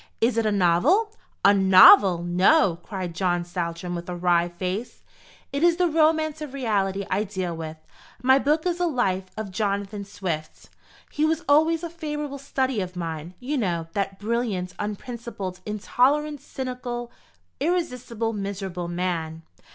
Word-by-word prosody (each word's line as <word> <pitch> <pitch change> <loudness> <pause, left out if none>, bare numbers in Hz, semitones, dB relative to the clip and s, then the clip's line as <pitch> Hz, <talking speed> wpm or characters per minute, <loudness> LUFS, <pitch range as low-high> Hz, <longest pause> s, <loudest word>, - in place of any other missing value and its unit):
"Is 230 +2 +2
it 225 -1 +1
a - - +2
novel?" 210 - +3 0.3
"A 200 - +8
novel! 190 -2 +7
no!" 180 - +3
cried 185 -4 -5
John 175 -1 0
Saltram, 175 0 -4
with 175 0 -6
a 180 - -3
wry 175 -1 +2
face; 185 +7 -5 0.5
"it 280 - -1
is 345 0 +5
the 355 0 +2
romance 315 -1 +2
of 285 -3 -6
reality 200 -6 0
I 195 +3 +1
deal 185 -4 -4
with. 160 -1 -6 0.4
My 260 +3 +4
book 305 +4 +1
is 355 -1 0
a 355 - +2
Life 195 - 0
of 215 -3 -5
Jonathan 200 +1 -2
Swift. 175 -6 -6 0.4
He 295 - -1
was 320 +2 +1
always 315 +3 +3
a - - -2
favourite 295 -4 -5
study 265 -4 -1
of 180 -1 -6
mine, 165 0 -5
you 275 +3 -2
know, 170 -6 -2
that 195 -1 -2
brilliant, 210 -4 -2
unprincipled, 210 -3 -5
intolerant, 275 +7 +1
cynical, 245 -2 -5 0.5
irresistible, 250 -9 -1
miserable 195 -3 -4
man. 170 -2 -3
205 Hz, 150 wpm, -24 LUFS, 180-275 Hz, 0.5 s, A